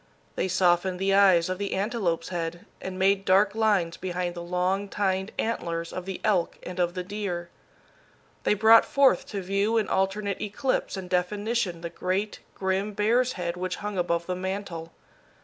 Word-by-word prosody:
They - - 0
softened 180 0 +2
the 195 +1 +1
eyes 190 -4 +5
of 185 0 -3
the 200 -1 -2
antelope's 195 -5 -1
head, 170 -1 -4 0.2
and 185 0 -5
made 195 +1 +3
dark 200 +2 +4
lines 205 -7 +1
behind 180 -1 -3
the 175 - -7
long 180 +3 -1
tined 190 0 -1
antlers 170 -7 -2
of 185 0 -5
the 190 - -4
elk 195 -6 +1
and 180 0 -7
of 175 0 +1
the 180 - -3
deer. 180 -3 -4 0.9
They - - +2
brought 225 +2 +7
forth 275 -1 +3
to 200 -3 -4
view 200 +4 +1
in 220 - +1
alternate 195 +1 -1
eclipse 215 +1 -1
and 190 -1 -6
definition 190 0 -1
the 170 -1 -5
great, 190 +4 -2 0.2
grim 195 +2 -1
bear's 235 +5 +2
head 170 -2 -3
which 180 0 -3
hung 205 -3 -2
above 170 -1 0
the 180 - -2
mantel. 185 -3 -5
190 Hz, 170 wpm, -26 LUFS, 180-205 Hz, 0.9 s, brought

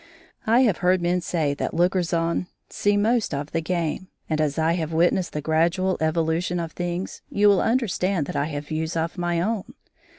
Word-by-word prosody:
I 235 +3 +5
have 220 -9 +3
heard 185 0 +2
men 175 +1 0
say 160 -5 0
that 140 - -3
lookers 175 0 +1
on 170 +1 0 0.2
see 205 0 +1
most 220 -5 +1
of 145 +1 -5
the 165 - 0
game, 170 +1 -2 0.2
and 155 -1 0
as 145 -2 0
I 160 +1 +2
have 165 -2 -2
witnessed 175 +2 +1
the 150 - -2
gradual 170 +5 +1
evolution 165 +2 0
of 165 -1 -4
things, 175 +2 -4
you 205 +1 +3
will 200 -2 +5
understand 200 - 0
that - - -6
I 145 0 +1
have 145 -1 -5
views 160 +1 -2
of 165 +3 -2
my 175 -1 0
own. 205 +2 -2
175 Hz, 195 wpm, -24 LUFS, 160-185 Hz, 0.2 s, I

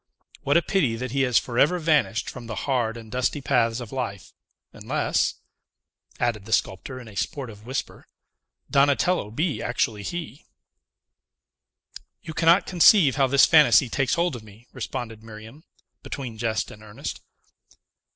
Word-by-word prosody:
What 145 +4 +3
a 170 - +2
pity 145 -11 +1
that 125 +1 -5
he 135 +1 0
has 125 -3 +3
forever 135 +8 +2
vanished 150 -9 +1
from 120 -3 -8
the 110 - -5
hard 120 -4 0
and 110 -2 -11
dusty 125 +3 -1
paths 120 -4 +1
of 120 -3 -8
life, 120 -8 -5 0.4
unless," - - -1 0.8
added 115 -4 -1
the 110 - -10
sculptor, 130 +7 -1
in 120 - -12
a 105 - -12
sportive 115 -4 -5
whisper, 130 +2 -5 0.6
"Donatello 140 - +2
be 150 +8 -2
actually 115 -3 -1
he!" 160 - -6 1.8
"You 160 - -7
cannot 170 +4 +4
conceive 175 - +5
how 135 -2 +3
this 140 +1 +6
fantasy 145 -3 +5
takes 135 +3 0
hold 170 -4 0
of 120 - -8
me," 110 +2 -17
responded 115 -3 -6
Miriam, 110 +7 -12 0.4
between 125 -6 -7
jest 110 -1 -1
and 105 - -13
earnest. 105 -1 -7
125 Hz, 145 wpm, -24 LUFS, 115-145 Hz, 1.8 s, this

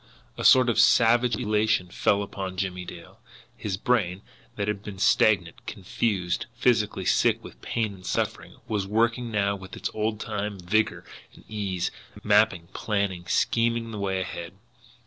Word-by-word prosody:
A - - -5
sort 130 -1 +7
of 115 -1 +2
savage 120 0 +5
elation 105 -3 +1
fell 100 +3 +1
upon 95 -2 -6
Jimmie 90 -1 -3
Dale. 85 - -11 0.4
His 95 -3 -3
brain, 100 -5 0 0.3
that 100 -1 -2
had 105 -1 -2
been 105 -2 -8
stagnant, 95 -3 +2
confused, 90 -6 -2
physically 115 -4 +1
sick - - +2
with - - -12
pain 110 -3 -2
and 95 -1 -14
suffering, - - -2
was 100 -3 -1
working 115 +3 +1
now 100 -2 +1
with 95 -1 -10
its - - -4
old 110 0 -1
time 105 -2 -4
vigour 105 +4 0 0.3
and - - -16
ease, 95 -4 -2 0.3
mapping, 105 -5 +3
planning, 100 -4 -2
scheming 115 0 +1
the 105 - -6
way 95 -1 -1
ahead. 85 -2 -6
105 Hz, 150 wpm, -26 LUFS, 95-110 Hz, 0.4 s, sort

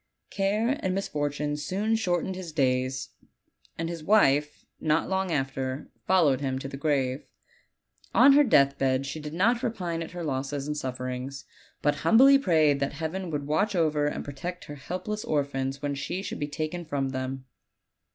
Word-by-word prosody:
Care 215 +7 0
and 185 0 -1
mis 195 - -1
fortune 145 0 -2
soon 195 +10 -1
shortened 185 -3 -1
his 180 -3 -7
days; 130 -3 0 0.7
and 165 - -2
his 165 -2 -5
wife, 150 -7 +3
not 155 +1 +1
long 190 -1 -1
after, 135 -2 -2 0.2
followed 155 -8 +4
him 130 -2 -1
to 135 - -5
the 135 - -7
grave. 135 -2 -1 0.9
On 275 - +8
her 295 +1 +7
deathbed 135 - +3
she 145 +3 -5
did 150 +1 -7
not 230 +7 +2
repine 180 -9 -2
at 165 - -5
her 175 -1 -5
losses 140 -1 -2
and 150 0 -3
sufferings, 130 0 -5 0.4
but 145 0 +2
humbly 265 - +6
prayed 155 - +3
that 140 0 -1
Heaven 165 +5 -4
would 145 -3 -3
watch 195 +8 +1
over 150 -3 +2
and - - -3
protect 175 +6 -6
her 145 - -8
helpless 185 +9 -4
orphans 140 -2 -2
when 145 -1 -1
she 175 +7 -4
should - - -5
be 145 - -2
taken 155 +4 -4
from 140 -4 -2
them. 130 0 -4
150 Hz, 170 wpm, -27 LUFS, 135-180 Hz, 0.9 s, On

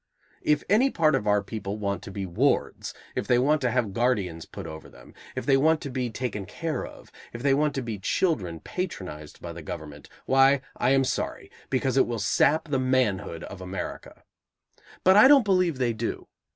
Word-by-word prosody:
If 150 - +2
any 225 +8 +4
part 155 -9 +2
of 105 - 0
our 105 0 +3
people 100 -1 -5
want 100 -3 -2
to 100 - -9
be 95 0 -4
wards, 85 -2 0 0.2
if - - -3
they 120 - +4
want 145 +5 +2
to 125 - +1
have 115 -4 0
guardians 100 -9 0
put - - -8
over 80 0 -9
them, - - -16 0.2
if - - -4
they 140 - +4
want 160 +3 +3
to 140 - -6
be 125 -1 -2
taken 105 -4 -4
care 165 - -3
of, - - -15 0.2
if 120 +1 -7
they 140 -1 +4
want 150 +1 +1
to 135 - -2
be 110 -4 -5
children, 95 - -1
patronized 90 - -6
by 85 -1 -6
the 85 - -8
government, 80 -5 -8 0.2
why, 135 +1 +4
I - - +1
am 135 0 +4
sorry, - - -3 0.2
because 130 0 0
it - - +4
will 120 -1 -2
sap 145 +9 +2
the 135 -2 +1
manhood 125 -10 0
of 95 -1 -9
America. 95 +1 -7 0.8
But 190 +2 +6
I 215 - +9
don't 275 -4 +6
believe 185 -6 +2
they 125 -3 +1
do. 115 +1 -4
125 Hz, 200 wpm, -26 LUFS, 100-145 Hz, 0.8 s, I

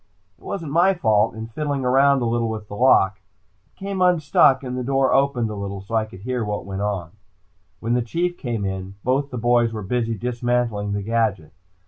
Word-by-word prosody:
It - - -24
wasn't 165 -7 -5
my 180 +5 +4
fault, 110 -7 +2
in 110 0 -6
fiddling 140 +3 -3
around 135 +1 +4
a - - 0
little 115 0 0
with 110 -1 -5
the 100 - -8
lock, 100 -5 +4 0.5
it - - -38
came 195 -1 -4
unstuck 155 -6 +4
and 125 -1 -4
the 125 - -3
door 135 0 +2
opened 135 -5 +1
a - - -5
little 100 -1 -5
so 100 +4 -11
I 110 -1 +2
could 95 -3 -13
hear 125 +1 -2
what 105 -2 -3
went 95 0 -5
on. 100 -5 -2 0.7
When 115 +2 -1
the 125 - +2
Chief 175 +9 -2
came 115 - -3
in, 95 0 -5
both 135 +3 0
the 125 - -6
boys 120 0 +2
were 110 -2 -5
busy 115 +2 -1
dismantling 120 -3 -1
the 100 0 -2
gadget. 110 -7 -1
120 Hz, 205 wpm, -22 LUFS, 105-135 Hz, 0.7 s, my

